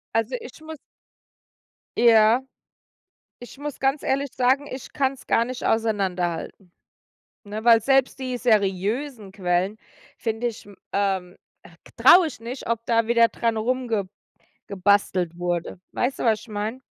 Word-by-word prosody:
Also 225 +3 0
ich 250 +6 -12
muss 315 0 -9 1.2
Ja, 230 0 +5 1.0
ich 245 - -12
muss 290 0 -6
ganz 270 +2 +1
ehrlich 275 +1 0
sagen, 260 +3 +2
ich 260 -2 -8
kann's 270 -1 -2
gar 230 - +2
nicht 255 0 -6
auseinanderhalten, 190 -5 -1 0.7
ne? 210 +1 -6
Weil 230 -1 +6
selbst 270 +2 +2
die 255 -2 -3
seriösen 215 +2 0
Quellen 185 +1 -1 0.4
finde 225 +1 -2
ich, 235 -3 -5
m 205 - -14 0.2
ähm, 190 -2 -1 0.3
äh, - - -13 0.3
traue 360 -1 +7
ich 260 - -11
nicht, 240 +3 -7
ob 230 0 -2
da 230 -1 +2
wieder 235 0 +4
dran 230 -1 -1
rumge 230 -4 -1 0.6
gebastelt 190 -3 +1
wurde. 175 0 -3
Weißt 260 +2 -1
du, - - -3
was 220 -3 +2
ich 230 - -15
meine? 215 +4 -4
225 Hz, 140 wpm, -24 LUFS, 200-255 Hz, 1.2 s, traue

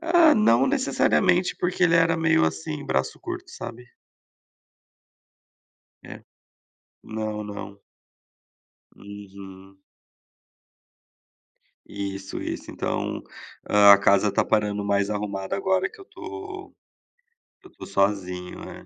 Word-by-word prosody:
Ah, 335 -1 +5
não 135 - +4
necessariamente, 175 +6 +2
porque 180 +1 -1
ele 170 -2 +4
era 165 0 +4
meio, 165 - +3
assim, 80 -1 -3
braço 65 0 -1
curto, - - -7
sabe? 120 +2 -8 2.2
É. - - -11 0.8
Não, 110 -1 -4
não. 100 -1 -8 1.1
Uhum. 95 -1 -12 2.1
Isso, 100 -1 -5
isso. - - -5
Então, - - -3 0.5
hã, 100 -1 +8
a 100 - +7
casa 100 +1 +3
está - - +1
parando 105 -1 0
mais 100 0 +1
arrumada 100 - -3
agora 190 -1 +1
que 440 - -17
eu 390 - -11
tô 395 0 -9 0.9
que 375 - -16
eu - - -22
tô - - -11
sozinho. 95 -2 -1
É. - - -11
105 Hz, 110 wpm, -24 LUFS, -, 2.2 s, hã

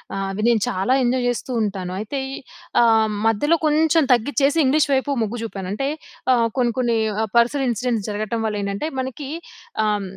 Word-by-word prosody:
ఆహ్, 195 0 -2
అవి 210 +2 -4
నేను 225 -3 +2
చాలా 195 +8 0
ఎంజాయ్ 245 0 +1
చేస్తూ 245 +2 -3
ఉంటాను. 190 -3 -3
అయితే 245 +6 -4 0.6
ఆహ్, 220 -1 +4 0.2
మధ్యలో 295 +10 +3
కొంచెం 315 +1 +3
తగ్గిచ్చేసి 280 +5 +1
ఇంగ్లీష్ 290 +2 +3
వైపు 265 +2 +1
మొగ్గు 225 +2 -4
చూపాను. 195 -4 -5
అంటే 275 +5 -2 0.5
ఆహ్, 230 -2 +3
కొన్ని 240 -2 +2
కొన్ని 235 -2 +1 0.2
ఆ - - +2
పర్సనల్ 260 +4 +3
ఇన్సిడెంట్స్ 235 -2 -1
జరగటం 215 +2 -2
వ‌లేంటంటే 205 +5 -2
మనకి 265 +2 -6 0.6
అం 210 -1 0
235 Hz, 160 wpm, -21 LUFS, 210-270 Hz, 0.6 s, ఆహ్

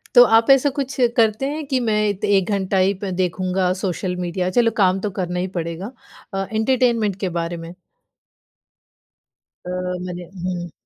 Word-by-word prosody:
तो 245 - +11
आप 230 +3 +3
ऐसा 275 +1 +5
कुछ 275 -1 -3 0.2
करते 220 +2 +2
हैं 305 +1 -4
कि 265 -2 0
मैं 215 -3 +1
त 215 - -5
1 200 -1 +2
घंटा 195 -1 0
ही 190 +1 +3
प 195 - -2
देखूँगा 185 0 0
सोशल 180 -1 -2
मीडिया, 180 +1 -2
चलो 230 +4 +3
काम 190 -2 +3
तो 205 +1 -2
करना 180 0 -2
ही 185 - -1
पड़ेगा 170 +7 -5 0.4
अ, 195 0 -1
एंटरटेनमेंट 225 -3 +1
के 190 - 0
बारे 170 +1 -3
में? 165 +1 -9 1.9
अ, - - -4 0.4
मने 180 -1 -6 0.2
हुँ। 175 -2 -3
195 Hz, 165 wpm, -21 LUFS, 180-225 Hz, 1.9 s, तो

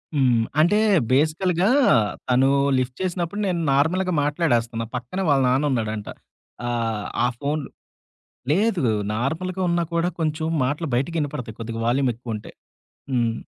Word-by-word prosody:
హ్మ్. 125 -5 +3 0.2
అంటే 205 +6 +4 0.3
బేసికల్‌గా 170 - +2 0.6
తను 130 +2 +4 0.3
లిఫ్ట్ 130 0 -2
చేసినప్పుడు 180 +1 -2
నేను 175 -2 0
నార్మల్‌గా 175 +7 +2
మాట్లాడేస్తున్నా 120 -7 0
పక్కనే 125 +11 -3
వాళ్ళ 140 -2 +4
నాన్నున్నాడంట. 120 -6 0 0.6
ఆహ్, 115 -3 -2 0.2
ఆ - - +4
ఫోన్లు 145 +1 -2 0.8
లేదు. 195 -1 +2 0.3
నార్మల్‌గా 170 - -2
ఉన్నా 170 0 +1
కూడా 170 +1 +1
కొంచెం 155 0 -1 0.2
మాటలు 150 +5 -1
బయటికినపడతాయి. 140 -5 -2
కొద్దిగా 115 0 -5
వాల్యూమ్ 130 +1 +2
ఎక్కువుంటే 115 -3 -7 0.6
హ్మ్. 120 -3 +1
140 Hz, 115 wpm, -23 LUFS, 120-170 Hz, 0.8 s, అంటే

